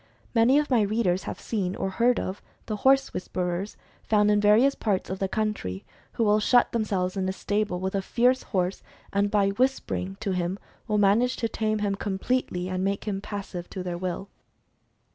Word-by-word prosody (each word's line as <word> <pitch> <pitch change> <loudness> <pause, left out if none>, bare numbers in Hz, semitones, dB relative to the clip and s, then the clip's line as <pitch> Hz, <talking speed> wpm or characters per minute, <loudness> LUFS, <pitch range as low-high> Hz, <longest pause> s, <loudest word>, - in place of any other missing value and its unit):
Many 235 +5 +5
of 295 -1 0
my 240 -3 +4
readers 200 -3 +1
have - - -5
seen, 195 -5 -2
or 195 - -2
heard 235 +4 +2
of, 190 +2 -4 0.2
the 215 - -3
horse 270 +4 +3
"whisperers" 180 +2 -3 0.2
found 210 -1 +3
in 205 0 +3
various 220 +7 +5
parts 200 -7 -1
of 190 - -4
the 195 - 0
country, 210 - -3 0.3
who 230 - 0
will 210 0 +4
shut 245 +3 +4
themselves 195 -5 -1
in 190 -1 -1
a - - +1
stable 205 -1 -1
with 190 +1 -2
a 195 - 0
fierce 245 +6 +2
horse, 185 -2 -2 0.3
and 200 +1 +2
by 200 -1 +3
"whispering" 200 -4 -1
to 195 - -2
him 180 +1 -1 0.3
will 210 - +1
manage 210 +5 +3
to 230 - -1
tame 215 -1 -1
him 200 - 0
com 195 -1 -3
pletely, 190 -5 -1
and 185 0 -2
make 200 +1 -1
him 195 -2 -3
passive 200 -4 -6
to 185 - -5
their 180 -1 -3
will. 185 +2 -4
205 Hz, 195 wpm, -26 LUFS, 190-220 Hz, 0.3 s, Many